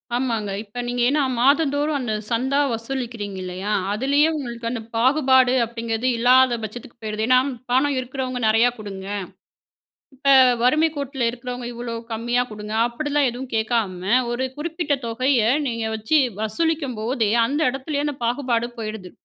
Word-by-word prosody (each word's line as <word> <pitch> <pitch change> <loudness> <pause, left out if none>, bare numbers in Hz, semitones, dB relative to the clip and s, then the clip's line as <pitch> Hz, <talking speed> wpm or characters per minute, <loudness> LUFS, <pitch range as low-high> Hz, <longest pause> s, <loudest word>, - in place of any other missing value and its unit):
ஆமாங்க. 230 -5 -1
இப்ப 225 +4 -6
நீங்க 245 0 -2
ஏன்னா 295 +1 +2 0.2
மாதந்தோறும் 285 +2 +2
அந்த 230 -4 -2 0.2
சந்தா 265 +5 +1
வசூலிக்கிறீங்கல்லியா, 210 -6 -4 0.2
அதுலேயே 280 +7 +3
உங்களுக்கு 235 -4 -5
அந்த 235 -1 -4
பாகுபாடு 260 0 +4
அப்படிங்குறது 230 +1 -3
இல்லாத 250 +1 +5
பட்சத்துக்கு 235 +2 -8
போயிருது 215 0 -3
ஏன்னா 255 0 +6 0.3
பணம் 270 +2 +3
இருக்குறவங்க 255 0 -4
நெறையா 225 +3 +4
குடுங்க. 195 -2 -8 1.1
இப்ப 275 +1 +1 0.3
வறுமைக் 310 +5 +3
கோட்ல 275 -3 -2
இருக்குறவங்க 245 0 -6
இவ்வளோ 235 0 -5 0.2
கம்மியா 240 +2 0
குடுங்க 210 0 -6
அப்படிலாம் 290 +2 0
எதுவும் 250 +2 -7
கேக்காம 215 -5 -1 0.2
ஒரு 240 +2 -1
குறிப்பிட்ட 320 0 -1
தொகைய 255 +3 +1 0.3
நீங்க 230 -2 -2
வச்சு 220 +8 +2 0.2
வசூலிக்கும்போதே 245 -2 -1 0.2
அந்த 290 +5 -1
இடத்துலேயே 280 +2 -3
அந்த 295 - -2
பாகுபாடு 240 -1 0
போயிடுது. 215 -4 -6
245 Hz, 130 wpm, -22 LUFS, 225-270 Hz, 1.1 s, ஏன்னா